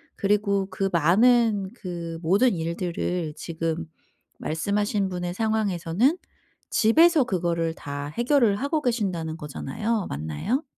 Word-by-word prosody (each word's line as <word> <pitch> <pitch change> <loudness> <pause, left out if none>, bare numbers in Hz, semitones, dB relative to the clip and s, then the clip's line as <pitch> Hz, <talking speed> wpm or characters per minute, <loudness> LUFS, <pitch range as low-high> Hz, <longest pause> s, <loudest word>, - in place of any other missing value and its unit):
그리고 200 -1 +1
그 195 0 -1
많은 205 +4 +4
그 170 -5 -6
모든 200 +9 +3
일들을 170 -1 -2
지금 165 0 -3 0.5
말씀하신 200 +4 -1
분의 175 -1 -3
상황에서는 220 - +1 0.5
'집에서 315 +6 +5
그거를 170 -5 -1
다 145 0 -6
해결을 240 - +2
하고 290 +4 -1
계신다.'는 185 - -1
거잖아요. 190 +9 -3
맞나요? 80 - -2
190 Hz, 265 characters per minute, -25 LUFS, 165-225 Hz, 0.5 s, 집에서